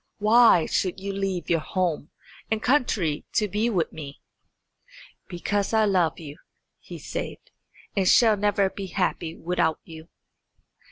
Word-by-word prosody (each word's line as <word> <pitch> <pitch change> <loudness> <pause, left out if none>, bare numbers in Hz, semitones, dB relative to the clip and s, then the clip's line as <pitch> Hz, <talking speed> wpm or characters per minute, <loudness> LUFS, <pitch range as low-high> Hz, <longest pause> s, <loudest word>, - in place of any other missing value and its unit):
Why 215 -5 +5
should 185 0 -1
you 200 +1 -5
leave 195 -3 -3
your 165 - +2
home 170 -2 -2 0.4
and 220 - 0
country 215 - +1
to 210 - +1
be 210 +4 0
with 180 -8 -1
me?" 145 -3 -9 1.1
"Because 200 +4 -2
I 220 -1 +4
love 180 -6 +1
you," 150 -3 -10 0.4
he - - -10
said, - - -5 0.6
"and 195 -2 +1
shall 225 -3 +5
never 205 -1 +1
be 195 -1 -7
happy 175 -3 -2
without 165 -2 -1
you." 160 0 -12
190 Hz, 135 wpm, -25 LUFS, 165-210 Hz, 1.1 s, Why